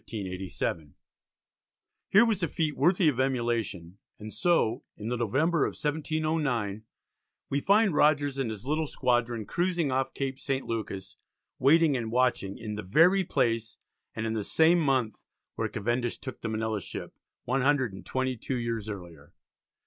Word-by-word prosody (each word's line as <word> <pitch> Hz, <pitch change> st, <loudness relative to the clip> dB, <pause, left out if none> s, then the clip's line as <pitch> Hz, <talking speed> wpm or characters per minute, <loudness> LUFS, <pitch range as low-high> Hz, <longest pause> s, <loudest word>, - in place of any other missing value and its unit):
Here 95 Hz, -6 st, -4 dB, 1.4 s
was 220 Hz, -4 st, 0 dB
a 170 Hz, -, +1 dB
feat 155 Hz, -2 st, -1 dB
worthy 175 Hz, +4 st, +3 dB
of 135 Hz, -5 st, +1 dB
emulation, 115 Hz, -9 st, -1 dB, 0.2 s
and 110 Hz, 0 st, -9 dB
so, 170 Hz, -10 st, +1 dB
in 105 Hz, +2 st, -5 dB
the 125 Hz, -, 0 dB
November 135 Hz, +8 st, +1 dB
of -, -, -1 dB
1709, 150 Hz, -8 st, -1 dB, 0.7 s
we 140 Hz, -, +2 dB
find 200 Hz, +1 st, +4 dB
Rogers 145 Hz, -2 st, +3 dB
and 130 Hz, -4 st, 0 dB
his 110 Hz, +1 st, -7 dB
little 155 Hz, +2 st, 0 dB
squadron 120 Hz, -4 st, 0 dB
cruising 170 Hz, -, 0 dB
off 130 Hz, 0 st, -1 dB
Cape 135 Hz, -1 st, -3 dB
St. 135 Hz, -1 st, -2 dB
Lucas 100 Hz, -4 st, -5 dB, 0.4 s
waiting 155 Hz, +2 st, +5 dB
and 115 Hz, -3 st, -3 dB
watching 125 Hz, -6 st, +1 dB
in 110 Hz, -1 st, -5 dB
the 105 Hz, -, -4 dB
"very 165 Hz, -, +4 dB
place" 115 Hz, -8 st, 0 dB, 0.4 s
and 110 Hz, -, -3 dB
in 110 Hz, -, -1 dB
the 110 Hz, -2 st, -2 dB
same 165 Hz, -, +4 dB
month 130 Hz, -8 st, 0 dB, 0.3 s
where -, -, -2 dB
Cavendish 120 Hz, +3 st, -1 dB
"took 130 Hz, -, -8 dB
the 115 Hz, -, -3 dB
Manila 110 Hz, -1 st, -2 dB
ship" -, -, -7 dB, 0.3 s
one 135 Hz, +3 st, 0 dB
hundred 130 Hz, -5 st, +2 dB
and 95 Hz, -, -9 dB
twenty 130 Hz, -1 st, -1 dB
two 125 Hz, +3 st, -3 dB
years 115 Hz, -3 st, -3 dB
earlier. 85 Hz, -6 st, -9 dB
125 Hz, 155 wpm, -28 LUFS, 110-150 Hz, 1.4 s, waiting